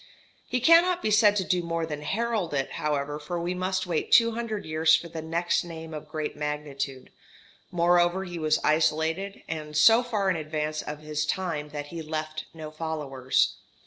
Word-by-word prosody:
He 250 Hz, -, 0 dB
cannot 345 Hz, +5 st, +5 dB
be 215 Hz, -, +1 dB
said 210 Hz, -1 st, +5 dB
to 195 Hz, -, +1 dB
do 180 Hz, -1 st, +1 dB
more 165 Hz, -1 st, -2 dB
than 150 Hz, -2 st, -5 dB
herald 215 Hz, -3 st, -1 dB
it, 135 Hz, -1 st, -1 dB
however, 145 Hz, 0 st, -2 dB
for 170 Hz, +4 st, -4 dB
we 175 Hz, +1 st, -2 dB
must 185 Hz, +1 st, -1 dB
wait 170 Hz, -3 st, -2 dB
two 230 Hz, 0 st, +6 dB
hundred 225 Hz, -2 st, -4 dB
years 155 Hz, 0 st, +4 dB
for 170 Hz, -, -3 dB
the 160 Hz, -1 st, -6 dB
next 165 Hz, +2 st, 0 dB
name 160 Hz, -2 st, -8 dB
of 150 Hz, 0 st, -7 dB
great 155 Hz, -1 st, -4 dB
magnitude; 145 Hz, -3 st, -4 dB, 0.6 s
moreover 175 Hz, +1 st, +3 dB
he 175 Hz, -2 st, -6 dB
was 155 Hz, -1 st, +2 dB
isolated, 160 Hz, +5 st, +1 dB
and 150 Hz, -2 st, -4 dB
so 225 Hz, +10 st, +7 dB
far 220 Hz, -5 st, -1 dB
in -, -, 0 dB
advance 155 Hz, 0 st, -3 dB
of 150 Hz, 0 st, -7 dB
his 150 Hz, 0 st, -2 dB
time 155 Hz, -3 st, -2 dB
that 145 Hz, 0 st, -6 dB
he 170 Hz, 0 st, -6 dB
left 155 Hz, 0 st, -4 dB
no 155 Hz, -2 st, -8 dB
followers. 150 Hz, -5 st, -1 dB
160 Hz, 180 wpm, -27 LUFS, 150-185 Hz, 0.6 s, so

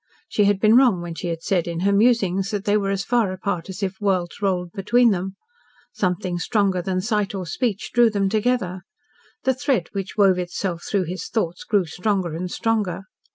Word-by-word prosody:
She 210 Hz, -, +2 dB
had 200 Hz, -1 st, +2 dB
been 215 Hz, +2 st, +5 dB
wrong 245 Hz, -8 st, +5 dB
when 175 Hz, -1 st, -5 dB
she 170 Hz, -, -5 dB
had 165 Hz, -1 st, -4 dB
said 180 Hz, -3 st, 0 dB
in 170 Hz, 0 st, -3 dB
her 200 Hz, +2 st, +2 dB
musings 200 Hz, -4 st, +2 dB
that 205 Hz, -3 st, -3 dB
they 205 Hz, -, +2 dB
were 200 Hz, -2 st, +1 dB
as 195 Hz, -2 st, -1 dB
far 235 Hz, -5 st, +2 dB
apart 185 Hz, -2 st, -3 dB
as 190 Hz, +2 st, -6 dB
if 190 Hz, +1 st, -3 dB
worlds 185 Hz, -2 st, -1 dB
rolled 180 Hz, -3 st, 0 dB
between 230 Hz, +5 st, +3 dB
them. 190 Hz, 0 st, -3 dB, 0.6 s
Something 180 Hz, -1 st, -1 dB
stronger 195 Hz, -2 st, +1 dB
than 185 Hz, 0 st, -1 dB
sight 210 Hz, -1 st, -1 dB
or 185 Hz, -2 st, -4 dB
speech 210 Hz, +2 st, -2 dB
drew 240 Hz, -1 st, +5 dB
them 200 Hz, -2 st, 0 dB
together. 210 Hz, -3 st, 0 dB, 0.6 s
The 265 Hz, -, +3 dB
thread 255 Hz, -, 0 dB
which 195 Hz, 0 st, -5 dB
wove 195 Hz, -3 st, +4 dB
itself 175 Hz, -1 st, -3 dB
through 200 Hz, -2 st, +1 dB
his 180 Hz, +2 st, -5 dB
thoughts 175 Hz, -6 st, -2 dB
grew 205 Hz, -4 st, +1 dB
stronger 180 Hz, +1 st, -1 dB
and 180 Hz, +3 st, -4 dB
stronger. 210 Hz, -3 st, -1 dB
195 Hz, 200 wpm, -22 LUFS, 180-210 Hz, 0.6 s, been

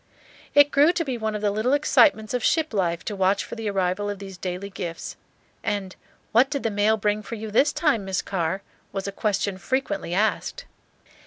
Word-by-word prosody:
It 290 Hz, 0 st, +7 dB
grew 290 Hz, +4 st, +5 dB
to 335 Hz, -2 st, -1 dB
be 265 Hz, -3 st, -2 dB
one 220 Hz, -2 st, -2 dB
of 210 Hz, -, -4 dB
the 205 Hz, -, +2 dB
little 215 Hz, +6 st, +1 dB
excitements 285 Hz, -6 st, +4 dB
of 250 Hz, -2 st, -1 dB
ship 315 Hz, -5 st, +2 dB
life 170 Hz, -4 st, 0 dB
to 210 Hz, -, -3 dB
watch 195 Hz, +1 st, +2 dB
for -, -, -9 dB
the 225 Hz, -2 st, -3 dB
arrival 195 Hz, +1 st, 0 dB
of 205 Hz, -, -3 dB
these 195 Hz, -1 st, -9 dB
daily 185 Hz, +2 st, -5 dB
gifts; 170 Hz, -3 st, -6 dB, 0.5 s
and 200 Hz, -2 st, -2 dB, 0.4 s
"What 250 Hz, +4 st, +5 dB
did 280 Hz, -2 st, -3 dB
the 225 Hz, -, 0 dB
mail 205 Hz, +2 st, +2 dB
bring 210 Hz, 0 st, 0 dB
for 230 Hz, -, -6 dB
you 220 Hz, -1 st, -6 dB
this 280 Hz, +7 st, +4 dB
time, 290 Hz, -11 st, +1 dB
Miss 190 Hz, -1 st, -1 dB
Carr?" 190 Hz, 0 st, -2 dB, 0.3 s
was 195 Hz, 0 st, -4 dB
a -, -, -2 dB
question 200 Hz, -1 st, -1 dB
frequently 200 Hz, -8 st, -2 dB
asked. 215 Hz, +3 st, 0 dB
210 Hz, 200 wpm, -24 LUFS, 195-235 Hz, 0.5 s, It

